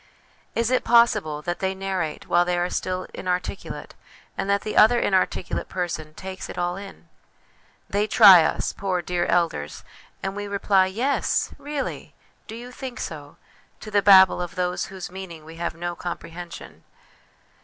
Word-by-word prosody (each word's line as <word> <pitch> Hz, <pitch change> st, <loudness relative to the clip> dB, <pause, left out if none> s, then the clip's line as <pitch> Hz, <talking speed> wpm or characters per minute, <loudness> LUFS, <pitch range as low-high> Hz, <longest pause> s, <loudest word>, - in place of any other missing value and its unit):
Is 230 Hz, +1 st, +1 dB
it 255 Hz, -, +2 dB
possible 160 Hz, -11 st, +3 dB
that 175 Hz, +2 st, -3 dB
they 190 Hz, 0 st, -1 dB
narrate 190 Hz, -5 st, -3 dB
while 175 Hz, 0 st, +4 dB
they 175 Hz, 0 st, -1 dB
are 175 Hz, +1 st, -1 dB
still 185 Hz, 0 st, -2 dB
inarticulate, 180 Hz, +1 st, -4 dB, 0.4 s
and 195 Hz, -, -3 dB
that 200 Hz, 0 st, +2 dB
the 215 Hz, -, -4 dB
other 240 Hz, +3 st, +6 dB
inarticulate 190 Hz, -3 st, 0 dB
person 160 Hz, -4 st, -4 dB
takes 190 Hz, 0 st, -7 dB
it -, -, -8 dB
all 175 Hz, 0 st, -1 dB
in? 195 Hz, 0 st, -11 dB, 0.8 s
They 205 Hz, +1 st, 0 dB
try 195 Hz, -6 st, +9 dB
us, -, -, -1 dB
poor 185 Hz, -3 st, -2 dB
dear 175 Hz, 0 st, -1 dB
elders, 165 Hz, -, -1 dB, 0.4 s
and 195 Hz, 0 st, -3 dB
we 205 Hz, 0 st, -4 dB
reply 200 Hz, -1 st, +2 dB
'Yes,' 245 Hz, +9 st, 0 dB
' -, -, -24 dB
Really! 290 Hz, -2 st, -4 dB
' -, -, -35 dB
' -, -, -39 dB
Do 220 Hz, -, -7 dB
you 245 Hz, +2 st, -9 dB
think 255 Hz, 0 st, -7 dB
so? 145 Hz, -2 st, -7 dB, 0.2 s
' -, -, -35 dB
to 215 Hz, -, -8 dB
the 205 Hz, -1 st, +3 dB
babble 190 Hz, -2 st, +7 dB
of 175 Hz, 0 st, -5 dB
whose 180 Hz, 0 st, -3 dB
meaning 175 Hz, -4 st, -9 dB
we 165 Hz, +1 st, -11 dB
have 170 Hz, -1 st, -3 dB
no 175 Hz, +1 st, -4 dB
comprehension. 175 Hz, 0 st, -8 dB
185 Hz, 170 wpm, -24 LUFS, 175-200 Hz, 0.8 s, try